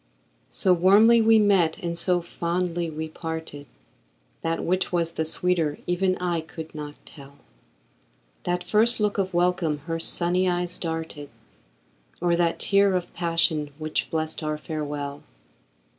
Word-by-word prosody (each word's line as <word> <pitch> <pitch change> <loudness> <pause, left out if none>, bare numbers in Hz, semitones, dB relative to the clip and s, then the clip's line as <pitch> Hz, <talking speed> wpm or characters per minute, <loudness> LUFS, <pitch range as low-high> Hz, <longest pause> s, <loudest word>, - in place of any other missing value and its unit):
So 185 - +2
warmly 205 +7 +6
we 225 0 +6
met 195 -6 +3
and 170 -5 -4
so 175 0 +1
fondly 175 0 -2
we 160 0 -5
parted, 160 -3 -6 0.7
That 165 0 -1
which 185 +2 0
was 170 -2 0
the 160 - -1
sweeter 165 -2 0
even 185 +1 +1
I 175 -2 -1
could 160 0 -9
not 150 -1 -7
tell, 140 -1 -14 1.1
That 180 0 -1
first 225 +3 +3
look 210 -1 0
of 190 -1 0
welcome 175 -3 +1
her 165 -1 -3
sunny 180 +2 +1
eyes 175 0 -1
darted, 160 -3 -4 0.9
Or 175 0 +2
that 170 -1 +1
tear 200 -1 +3
of 180 -1 -3
passion, 165 -3 +1
which 155 0 -2
blest 160 0 -2
our 155 -1 -2
farewell. 145 -2 -5
170 Hz, 140 wpm, -25 LUFS, 160-180 Hz, 1.1 s, warmly